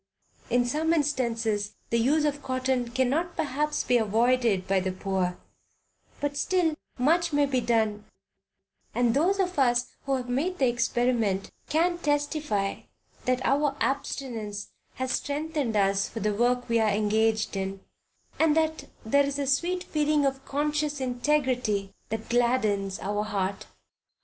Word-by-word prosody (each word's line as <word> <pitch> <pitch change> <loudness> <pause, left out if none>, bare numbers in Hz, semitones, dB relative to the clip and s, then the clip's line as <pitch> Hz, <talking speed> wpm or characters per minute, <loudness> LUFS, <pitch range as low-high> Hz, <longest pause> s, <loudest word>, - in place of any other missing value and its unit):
In 245 +1 +3
some 310 +6 +1
instances 230 -9 0 0.2
the 235 - +3
use 295 +6 +3
of 290 -1 -1
cotton 255 -2 -1
cannot 270 +8 0
perhaps 300 0 -1
be 245 - +3
avoided 225 -2 +2
by 195 0 +3
the 185 0 -2
poor, 185 -1 -2 0.8
but 290 0 -2
still 345 +1 +1 0.2
much 335 +6 +2
may 290 -1 +3
be 260 -3 0
done, 220 -3 0 0.9
and 240 -1 +3
those 360 +9 +2
of 365 -4 0
us 245 -2 +2
who 275 - +2
have 250 -1 -4
made 305 +9 -1
the 265 - +3
experiment 235 -4 0 0.2
can 345 +3 +2
testify 290 -9 0 0.5
that 255 0 0
our 280 0 +2
abstinence 230 -7 -3 0.2
has 260 0 -2
strengthened 290 -4 -1
us 195 -1 +2
for 225 - -6
the 210 0 0
work 245 +3 +1
we 230 -1 +2
are 220 -1 +3
engaged 215 +1 +1
in, 195 0 -3 0.6
and 320 -1 +4
that 315 0 0 0.2
there 280 +6 +4
is 280 0 -2
a 285 - -1
sweet 345 +7 +1
feeling 300 -2 +1
of 270 0 -1
conscious 295 0 -1
integrity 250 -6 0 0.2
that 220 0 -4
gladdens 215 -5 +1
our 205 +2 -1
hearts. 200 -2 -2
250 Hz, 145 wpm, -27 LUFS, 215-290 Hz, 0.9 s, and